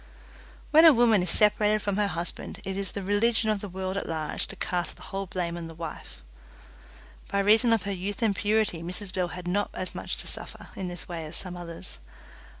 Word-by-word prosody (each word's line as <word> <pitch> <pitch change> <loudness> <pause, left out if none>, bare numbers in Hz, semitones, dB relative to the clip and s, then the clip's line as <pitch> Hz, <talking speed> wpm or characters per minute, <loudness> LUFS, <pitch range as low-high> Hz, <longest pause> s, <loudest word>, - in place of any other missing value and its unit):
When 315 +1 +8
a 325 -2 +10
woman 230 -5 +5
is 180 - 0
separated 210 +1 +4
from 205 -1 -1
her 210 -1 +3
husband 175 -1 -4
it 190 - -2
is 195 0 -2
the 200 - -4
religion 220 +3 +2
of 205 -2 -1
the 205 - -5
world 190 +1 -3
at 200 - -3
large 160 -2 -2
to - - -8
cast 175 -1 -1
the - - -14
whole 195 0 -4
blame 175 -2 -2
on 170 -1 -5
the 165 - -10
wife. 165 -1 -8 1.0
By 200 - -1
reason 215 +4 +5
of 225 -2 +3
her 200 - -2
youth 200 +6 -3
and 210 -3 +3
purity 210 -5 +1
Mrs 185 +3 -5
Bell 180 -2 0
had 180 0 -7
not 205 +3 +1
as 185 - -3
much - - -4
to - - -4
suffer - - -6
in 190 - -4
this 175 0 -7
way 170 -2 -4
as 155 - -6
some 180 -2 -2
others. 175 +1 -8
195 Hz, 220 wpm, -28 LUFS, 175-210 Hz, 1.0 s, a